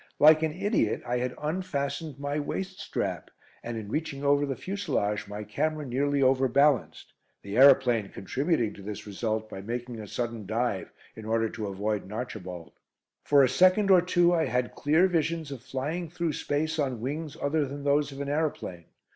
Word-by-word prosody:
Like 155 +1 +7
an 160 -1 0
idiot, 200 - +1
I 125 0 0
had 125 +1 -2
unfastened 150 -3 -3
my 145 +1 -2
waist 185 +6 -4
strap, - - -3 0.3
and 120 -1 -5
in 105 -2 -6
reaching 150 +1 -3
over 145 0 +3
the 135 - -2
fuselage 135 - -2
my 105 +1 -6
camera 150 +8 -2
nearly 140 +2 +1
over 130 0 +4
balanced, 130 - +2 0.3
the 100 +1 -5
aeroplane 125 -5 +6
contributing 130 - -1
to - - -12
this 105 +1 -6
result 110 +1 -2
by 95 -2 -8
making 120 +2 -5
a 105 - -7
sudden 115 -2 -4
dive 110 -2 -1 0.2
in 110 - -9
order 115 0 +1
to 110 -2 -5
avoid 100 +1 -2
an 95 - -12
"Archibald." 90 -8 -6 0.5
For 145 -1 +6
a - - +5
second 185 - +4
or 185 -2 +7
two 175 0 +3
I 165 -2 +2
had 125 0 -1
clear 155 +5 +3
visions 165 -3 -1
of 135 -4 -7
flying 150 +7 -4
through 170 -1 -2
space 155 +3 -1
on 130 -5 -1
wings 150 +5 -4
other 145 0 0
than 140 +1 -7
those 145 +1 +2
of 135 +1 -7
an 140 - -3
aeroplane. 145 - -2
140 Hz, 180 wpm, -28 LUFS, 110-155 Hz, 0.5 s, Like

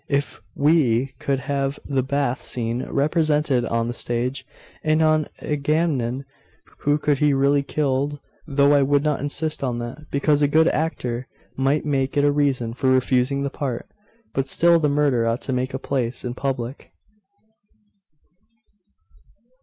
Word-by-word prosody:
If 140 0 -1
we 135 -4 +2
could 135 -2 -1
have 140 0 -2
the 135 -2 0
bath 135 -1 -1
scene 120 0 -2
represented 150 -3 +1
on 115 0 -1
the 120 - -3
stage, 120 +3 -2 0.4
and 155 0 +2
an 155 -1 +3 0.2
Agamemnon 145 -4 0 0.5
who 145 +1 +2
could 145 -2 0
be 150 -2 +3
really 140 +1 +3
killed 145 0 -1 0.3
though 140 0 +3
I 145 - +5
would 140 +1 +2
not 150 -2 0
insist 150 +1 -2
on 125 -3 -1
that, 120 +6 -7
because 145 +1 +2
a 145 - +4
good 160 +3 +4
actor 125 -6 -2 0.3
might 135 +3 +1
make 140 0 0
it 145 - +4
a 145 - +4
reason 135 -5 0
for 130 +2 0
refusing 130 +1 +2
the 140 - -2
part 130 -5 -4 0.5
but 135 0 -1
still 170 +3 +4
the 150 -2 +2
murder 140 -5 +2
ought 115 +2 -1
to 135 - -3
take 130 +1 -2
place 125 -3 -2
in 120 - -3
public. 130 -1 -4
140 Hz, 150 wpm, -22 LUFS, 130-145 Hz, 0.5 s, I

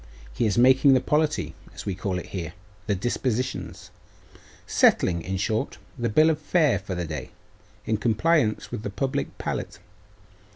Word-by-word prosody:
He 85 - +1
is 105 - 0
making 130 +2 +6
the - - +5
polity, 150 +3 0 0.2
as - - -8
we 100 - -1
call 95 0 -3
it 90 - -5
here; 85 -5 -5 0.3
the 100 - +1
dispositions; 110 -4 -3 0.7
settling, 85 -2 +3
in 95 +2 -3
short, 110 +6 -1 0.2
the 120 -3 -1
bill 155 +8 +5
of 155 - -2
fare 150 - +2
for 95 -1 -5
the 90 -1 -2
day, 75 -5 -6 0.6
in 110 - 0
compliance 115 +2 +1
with 120 -3 -4
the 105 - -4
public 135 +8 -3
palate. - - -4
110 Hz, 160 wpm, -25 LUFS, 95-135 Hz, 0.7 s, making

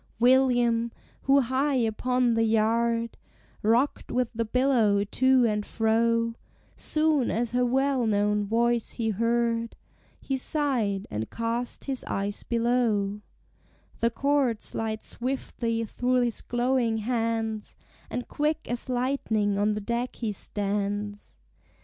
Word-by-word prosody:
William, 240 -2 +3 0.3
who 275 +1 +5
high 265 +3 0
upon 245 +1 +1
the 225 - +2
yard 230 +1 +1 0.4
Rocked 235 +6 +1
with 250 -2 0
the 230 0 -1
billow 225 -4 +3
to 260 +4 +3
and 210 -2 0
fro, 230 +1 +1 0.4
Soon 305 -4 +1
as 235 0 -1
her 250 +1 +2
well 260 0 +1
known 210 0 +2
voice 235 +2 +1
he 225 -2 -1
heard 230 +1 0 0.4
He 270 - -2
sighed, 250 -9 -1
and 110 +1 -3
cast 230 +1 -3
his 270 -2 -3
eyes 200 +1 -3
below: 230 -4 0 0.8
The 230 - +3
cord 270 -2 +1
slides 220 -1 -4
swiftly 235 -2 -3
through 250 +3 +1
his 240 -2 -1
glowing 240 -2 0
hands, 225 -1 -2 0.3
And 245 - -4
quick 305 +2 -1
as 240 +2 -4
lightning 235 -5 0
on 210 +1 +2
the 210 - -3
deck 235 +4 -2
he 225 -3 -2
stands. 205 0 -3
230 Hz, 125 wpm, -27 LUFS, 220-250 Hz, 0.8 s, who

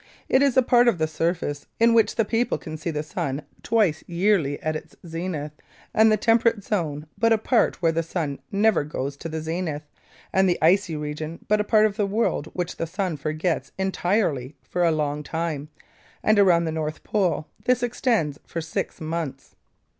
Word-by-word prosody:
It 260 - +4
is 275 -2 +3
a 260 - +6
part 245 0 +4
of 235 - +4
the 160 - +1
surface 160 -2 -2
in 230 0 +5
which 225 -1 +3
the 225 - +2
people 235 +3 0
can 155 - -7
see 155 +2 -4
the 150 -2 -2
sun 145 -2 -3 0.2
twice 210 -9 +1
yearly 170 -5 +1
at 155 0 -1
its - - -8
zenith, 165 -3 -4 0.4
and 220 0 +5
the 215 - +4
temperate 225 0 +3
zone 155 -8 -2
but 230 0 +3
a 225 - +6
part 220 -4 +1
where 165 - +4
the 165 +1 0
sun 160 -4 -3
never 205 -4 +3
goes 140 -1 -4
to 165 - -6
the 160 0 -4
zenith, 160 -2 -3 0.5
and 190 0 +4
the 175 - +2
icy 175 +1 +3
region 150 +2 -5
but 210 0 +3
a - - 0
part 215 0 +4
of 210 -1 -1
the 205 -2 +1
world 205 -7 0
which 180 -1 -3
the 165 - -2
sun 180 0 -2
forgets 155 +4 -2
entirely 180 - 0
for 180 - -1
a 170 - +5
long 150 -2 -1
time, 155 -1 -3 0.5
and 215 -1 +4
around 175 -4 +5
the 160 - -1
North 155 -1 -4
Pole 185 -7 0 0.2
this 250 -1 +2
extends 230 - 0
for 170 - -5
six 160 -1 -4
months. 155 -4 -5
170 Hz, 190 wpm, -24 LUFS, 155-210 Hz, 0.5 s, a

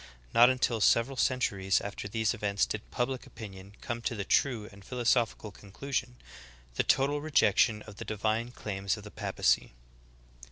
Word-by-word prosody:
Not 120 +2 +8
until 125 -3 +1
several 115 +6 +3
cen 130 0 +1
turies 95 -4 +1
after 100 0 -6
these 110 +1 0
events 100 -1 0
did 110 0 -6
public 130 +2 -2
opinion 100 -4 -10
come 120 0 -4
to 120 - -2
the 100 - -3
true 115 -4 +1
and 100 0 -15
philosophical 120 -2 0
conclusion 125 +6 -4 0.3
— - - -23
the - - +4
total 145 +2 +2
rejection 120 -7 +3
of 105 -2 -12
the - - -6
di 110 - -4
vine 110 +3 0
claims 100 -3 -3
of 105 - -10
the 105 - -10
papacy. - - 0
110 Hz, 170 wpm, -30 LUFS, 100-125 Hz, 0.3 s, Not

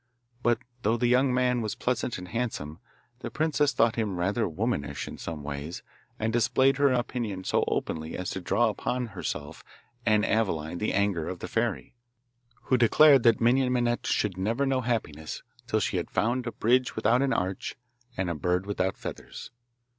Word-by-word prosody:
But 120 -1 +3 0.2
though 115 +1 +2
the 120 - 0
young 125 +2 +4
man 125 -1 +2
was 110 -2 -3
pleasant 125 -1 -1
and 90 0 -9
handsome, 95 -9 -3 0.4
the - - -5
princess 150 -2 +1
thought 115 -3 +2
him 105 -5 -1
rather 100 +5 0
womanish 95 -2 -2
in - - -8
some 80 -3 -6
ways, 75 +3 -5 0.3
and 110 0 -1
displayed 125 +3 +3
her 140 -1 +4
opinion 120 -6 -2
so - - +1
openly 80 0 -2
as 90 - -3
to 95 - -4
draw 110 +6 +2
upon 125 +3 -2
herself 75 -6 -5 0.4
and 105 -3 +3
Aveline 85 -7 0
the 105 - 0
anger 100 -5 0
of 90 - -4
the - - -6
fairy, 115 +1 -2 0.7
who 130 - +2
declared 135 +4 +7
that 115 -1 +4
Minon 125 +2 +3
Minette 120 -1 0
should 95 -4 0
never 115 +8 0
know 135 -1 +1
happiness 80 - -3 0.2
till 110 -3 +1
she 95 - -1
had 85 - -3
found 120 +2 0
a - - -2
bridge 125 +4 +2
without 115 +3 +3
an 135 -1 +1
arch 95 -5 -2 0.4
and 95 -1 0
a 85 - -1
bird 90 +4 0
without 95 -2 -1
feathers. - - -8
110 Hz, 175 wpm, -28 LUFS, 90-125 Hz, 0.7 s, declared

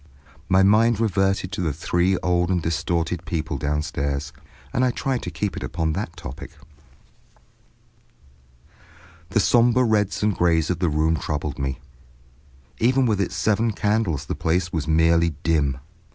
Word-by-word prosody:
My 95 0 +5
mind 110 +3 +4
reverted 95 -3 0
to 100 - -3
the 80 -3 0
three 90 +5 +1
old 90 -1 +1
and 90 -1 +1
distorted 85 +1 -1
people 80 -3 -3
downstairs, 70 -1 -2 0.4
and 125 - +1
I 130 - +3
tried 130 +1 -2
to - - -5
keep 95 +4 -3
it - - -6
upon 80 -2 -2
that 85 -3 -5
topic. 70 -4 -8 2.8
The 100 - +1
sombre 120 +3 +4
reds 105 -4 +1
and 105 -2 +2
grays 85 -1 +2
of 90 - -2
the 90 - +1
room 80 +2 +1
troubled 75 -2 -4
me; 65 -1 -2 1.0
even 130 +3 +3
with 105 -4 +1
its 95 -1 -2
seven 110 +4 +1
candles 105 -8 0
the - - -3
place 85 +1 -1
was 80 -3 -2
merely 80 0 +3
dim. 75 -5 +1
90 Hz, 150 wpm, -23 LUFS, 80-105 Hz, 2.8 s, My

